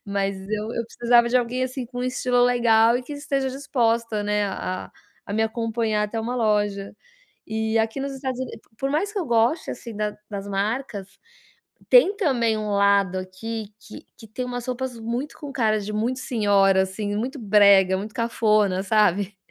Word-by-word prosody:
mas 200 Hz, -1 st, -1 dB
eu 215 Hz, +1 st, -2 dB
eu 235 Hz, -, -2 dB
precisava 235 Hz, +1 st, +3 dB
de 255 Hz, -, +4 dB
alguém, 250 Hz, +1 st, -2 dB
assim, 255 Hz, -1 st, -5 dB
com 245 Hz, 0 st, -6 dB
um -, -, -1 dB
estilo 250 Hz, -1 st, +1 dB
legal 235 Hz, -2 st, +4 dB
e -, -, -7 dB
que 290 Hz, +4 st, -8 dB
esteja 275 Hz, -2 st, -1 dB
disposta 230 Hz, -5 st, 0 dB
né, 210 Hz, 0 st, 0 dB
a 195 Hz, -2 st, -4 dB, 0.2 s
a -, -, -23 dB, 0.4 s
a -, -, -5 dB
me 220 Hz, +2 st, +1 dB
acompanhar 225 Hz, -1 st, -1 dB
até 215 Hz, +2 st, -2 dB
uma 240 Hz, +3 st, -3 dB
loja. 205 Hz, -3 st, 0 dB, 0.5 s
E 220 Hz, +1 st, -1 dB
aqui 225 Hz, +4 st, 0 dB
nos 275 Hz, 0 st, -3 dB
Estados 260 Hz, -2 st, -4 dB
Unidos, 260 Hz, -, -6 dB, 0.2 s
por 270 Hz, -, -1 dB
mais 330 Hz, +8 st, 0 dB
que 420 Hz, -, -3 dB
eu 360 Hz, -, -1 dB
goste, 235 Hz, +7 st, +1 dB
assim, 230 Hz, -3 st, -8 dB
da 210 Hz, 0 st, -2 dB, 0.2 s
das 200 Hz, -1 st, -5 dB
marcas, 200 Hz, 0 st, -3 dB, 0.7 s
tem 420 Hz, -5 st, +6 dB
também 245 Hz, -, +1 dB
um 210 Hz, -1 st, -3 dB
lado 200 Hz, -2 st, +3 dB
aqui 205 Hz, +3 st, -6 dB
que -, -, -12 dB
que 225 Hz, -, -13 dB
tem 250 Hz, +4 st, -4 dB
umas 245 Hz, -1 st, -5 dB
roupas 255 Hz, -1 st, -4 dB
muito 235 Hz, +6 st, -4 dB
com 290 Hz, -2 st, -7 dB
cara 220 Hz, -5 st, +1 dB
de 205 Hz, +1 st, -5 dB
muito 230 Hz, +5 st, -1 dB
senhora, 200 Hz, -5 st, +3 dB
assim, 205 Hz, +2 st, -3 dB
muito 255 Hz, +6 st, -3 dB
brega, 200 Hz, -3 st, +5 dB
muito 210 Hz, +2 st, -7 dB
cafona, 215 Hz, -5 st, +1 dB
sabe. 200 Hz, -1 st, +2 dB
225 Hz, 185 wpm, -23 LUFS, 205-250 Hz, 0.7 s, tem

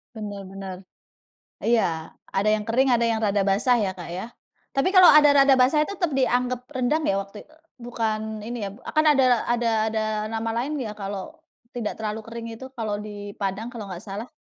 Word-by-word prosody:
Benar 205 Hz, -2 st, -6 dB
benar, 195 Hz, -1 st, -7 dB, 0.9 s
iya 175 Hz, -9 st, +1 dB, 0.2 s
ada 200 Hz, +2 st, +1 dB
yang 215 Hz, -1 st, 0 dB
kering 260 Hz, +4 st, +3 dB
ada 235 Hz, -1 st, +3 dB
yang 225 Hz, -1 st, +1 dB
rada 205 Hz, -2 st, +1 dB
basah 200 Hz, +6 st, +3 dB
ya, 200 Hz, -3 st, 0 dB
Kak, 175 Hz, -, -8 dB
ya, 190 Hz, +7 st, -6 dB, 0.4 s
tapi 275 Hz, +6 st, +1 dB
kalau 370 Hz, -1 st, +9 dB
ada 295 Hz, 0 st, +7 dB
rada 275 Hz, -1 st, +5 dB
basah 275 Hz, +4 st, +4 dB
itu 400 Hz, -, -6 dB
tetap 350 Hz, -4 st, 0 dB
dianggap 250 Hz, -1 st, +1 dB
rendang 285 Hz, +4 st, 0 dB
ya 195 Hz, -, +2 dB
waktu 200 Hz, +1 st, -8 dB
itu, 310 Hz, -, -23 dB, 0.3 s
bukan 220 Hz, -2 st, -3 dB
ini 235 Hz, 0 st, -5 dB
ya -, -, -5 dB, 0.3 s
kan 310 Hz, 0 st, +4 dB
ada 255 Hz, -4 st, +3 dB
ada 240 Hz, 0 st, +1 dB, 0.2 s
ada 220 Hz, 0 st, 0 dB, 0.3 s
nama 225 Hz, 0 st, -2 dB
lain 295 Hz, +2 st, -3 dB
ya 225 Hz, -5 st, -4 dB
kalau 200 Hz, -, -6 dB, 0.4 s
tidak 225 Hz, -3 st, -4 dB
terlalu 215 Hz, 0 st, -3 dB
kering 230 Hz, 0 st, -7 dB
itu 260 Hz, -, -9 dB
kalau 220 Hz, -5 st, -3 dB
di 205 Hz, -1 st, -8 dB
padang 200 Hz, +3 st, -3 dB
kalau 230 Hz, -4 st, -7 dB
nggak 180 Hz, +2 st, -7 dB
salah. 210 Hz, +3 st, -6 dB
225 Hz, 190 wpm, -24 LUFS, 205-250 Hz, 0.9 s, kalau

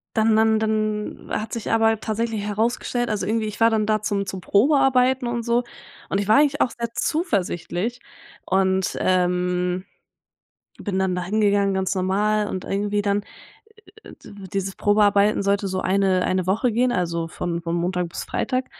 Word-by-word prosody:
dann 220 Hz, -1 st, +3 dB
dann 220 Hz, 0 st, +3 dB
dann 215 Hz, -1 st, -2 dB
hat 220 Hz, -, -3 dB
sich 230 Hz, -, -3 dB
aber 225 Hz, -1 st, +3 dB
tatsächlich 225 Hz, 0 st, -2 dB
herausgestellt 230 Hz, +3 st, -1 dB
also 205 Hz, -3 st, -2 dB
irgendwie, 220 Hz, +1 st, 0 dB
ich 210 Hz, -1 st, -6 dB
war 225 Hz, -, +6 dB
dann 220 Hz, -2 st, +1 dB
da 215 Hz, -1 st, +1 dB
zum 200 Hz, -1 st, -1 dB
zum 190 Hz, -1 st, -6 dB
Probearbeiten 255 Hz, -, +3 dB
und 240 Hz, -1 st, -2 dB
so 235 Hz, +1 st, +1 dB, 0.5 s
und 195 Hz, -, 0 dB
ich 200 Hz, -, -2 dB
war 215 Hz, -, +5 dB
eigentlich 290 Hz, 0 st, +3 dB
auch 245 Hz, -, +2 dB
sehr 235 Hz, -1 st, -5 dB
zuversichtlich 230 Hz, -, -1 dB, 0.5 s
und, 190 Hz, 0 st, +1 dB
ähm, 180 Hz, 0 st, 0 dB, 0.9 s
bin 200 Hz, -3 st, -3 dB
dann 190 Hz, -1 st, +1 dB
da 180 Hz, -, -2 dB
hingegangen, 200 Hz, 0 st, +2 dB
ganz 190 Hz, 0 st, 0 dB
normal, 205 Hz, +3 st, +1 dB
und 185 Hz, -2 st, -4 dB
irgendwie 205 Hz, +1 st, -1 dB
dann 205 Hz, 0 st, 0 dB, 0.8 s
Äh, -, -, -12 dB
d -, -, -12 dB, 0.2 s
dieses 195 Hz, -1 st, -2 dB
Probearbeiten 205 Hz, 0 st, +3 dB
sollte 200 Hz, 0 st, +1 dB
so 185 Hz, 0 st, -2 dB
eine 190 Hz, -1 st, +2 dB
eine 185 Hz, -1 st, 0 dB
Woche 220 Hz, +6 st, +1 dB
gehen, 245 Hz, +3 st, +2 dB
also 170 Hz, -6 st, -1 dB
von 170 Hz, +1 st, -4 dB
von 165 Hz, 0 st, -3 dB
Montag 175 Hz, 0 st, -1 dB
bis -, -, -6 dB
Freitag. 255 Hz, 0 st, -1 dB
205 Hz, 170 wpm, -23 LUFS, 190-225 Hz, 0.9 s, war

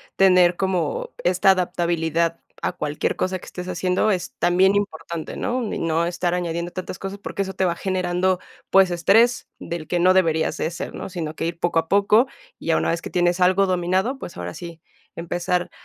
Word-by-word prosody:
tener 180 Hz, -2 st, +5 dB
como 190 Hz, -, -1 dB
esta 185 Hz, +1 st, +4 dB
adaptabilidad 170 Hz, -2 st, 0 dB, 0.2 s
a -, -, 0 dB
cualquier 150 Hz, 0 st, -2 dB
cosa 185 Hz, 0 st, -1 dB
que -, -, -13 dB
estés 180 Hz, 0 st, -7 dB
haciendo 185 Hz, +3 st, +1 dB
es 185 Hz, -3 st, -2 dB
también 185 Hz, +3 st, +3 dB
importante, 170 Hz, -5 st, -3 dB
¿no? 255 Hz, 0 st, -1 dB
Y -, -, -3 dB
no 165 Hz, 0 st, +1 dB
estar 175 Hz, 0 st, -1 dB
añadiendo 170 Hz, 0 st, -3 dB
tantas 185 Hz, 0 st, -6 dB
cosas, 195 Hz, +1 st, -5 dB
porque 200 Hz, -, -4 dB
eso 190 Hz, -1 st, -3 dB
te 190 Hz, 0 st, 0 dB
va 170 Hz, -2 st, 0 dB
generando, 185 Hz, 0 st, 0 dB, 0.3 s
pues, 195 Hz, -2 st, +5 dB
estrés 215 Hz, +8 st, +3 dB
del 170 Hz, -2 st, -6 dB
que 175 Hz, -, 0 dB
no 185 Hz, +2 st, +5 dB
deberías 165 Hz, -4 st, +2 dB
de 160 Hz, -, -1 dB
ser, 170 Hz, -, -6 dB
¿no? -, -, -6 dB
Sino 165 Hz, -4 st, -5 dB
que -, -, -3 dB
ir 170 Hz, 0 st, -5 dB
poco 175 Hz, -1 st, +2 dB
a 165 Hz, -, -3 dB
poco, 205 Hz, +5 st, +4 dB, 0.3 s
y -, -, -10 dB
ya -, -, +3 dB
una -, -, 0 dB
vez 165 Hz, 0 st, -2 dB
que -, -, -7 dB
tienes 175 Hz, 0 st, +1 dB
algo 185 Hz, +2 st, +4 dB
dominado, 185 Hz, +8 st, 0 dB
pues, 175 Hz, -, -8 dB
ahora 90 Hz, 0 st, -5 dB
sí, 170 Hz, -2 st, -9 dB, 0.4 s
empezar 175 Hz, +1 st, -2 dB
180 Hz, 195 wpm, -22 LUFS, 170-190 Hz, 0.4 s, tener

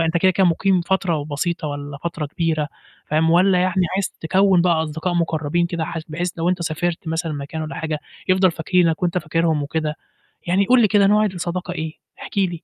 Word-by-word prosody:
أنت 165 Hz, +1 st, +1 dB
كده، 185 Hz, +2 st, +4 dB
كده 190 Hz, -1 st, +3 dB
مُقيم 185 Hz, +2 st, +2 dB
فترة 180 Hz, -2 st, 0 dB
وبسيطة 155 Hz, +3 st, -3 dB
والَّا 145 Hz, 0 st, -6 dB
فترة 165 Hz, -3 st, -3 dB
كبيرة. 155 Hz, 0 st, -1 dB, 0.4 s
فاهم، 160 Hz, +2 st, +2 dB
والَّا 180 Hz, +2 st, +4 dB
يعني 185 Hz, 0 st, +2 dB
عايز 195 Hz, -1 st, 0 dB
تكوّن 185 Hz, +2 st, +3 dB
بقى 170 Hz, -3 st, +2 dB
أصدقاء 160 Hz, +3 st, -3 dB
مُقربين 165 Hz, 0 st, 0 dB
كده 170 Hz, -2 st, -3 dB
حث 165 Hz, -1 st, -5 dB
بحيث 175 Hz, +3 st, -2 dB
لو 165 Hz, -, +1 dB
أنت 180 Hz, -1 st, 0 dB
سافرت 165 Hz, +1 st, -2 dB
مثلًا 160 Hz, 0 st, -2 dB
مكان 145 Hz, +2 st, -5 dB
والَّا 155 Hz, -, -5 dB
حاجة، 160 Hz, -1 st, -3 dB, 0.3 s
يفضل 185 Hz, 0 st, +4 dB
فاكرينّك 165 Hz, 0 st, +1 dB
وأنت 175 Hz, 0 st, +1 dB
فاكِرهُم 160 Hz, -1 st, 0 dB
وكده 150 Hz, +1 st, -2 dB, 0.5 s
يعني 190 Hz, +3 st, +3 dB
قُل 250 Hz, +3 st, +5 dB
لي 220 Hz, -, +5 dB
كده، 200 Hz, -1 st, +4 dB
نوع 210 Hz, +1 st, +4 dB
الصداقة 180 Hz, -1 st, -3 dB
إيه؟ 160 Hz, -2 st, -4 dB, 0.3 s
احكِ -, -, -9 dB
لي. 190 Hz, -2 st, +3 dB
170 Hz, 195 wpm, -21 LUFS, 160-185 Hz, 0.5 s, قُل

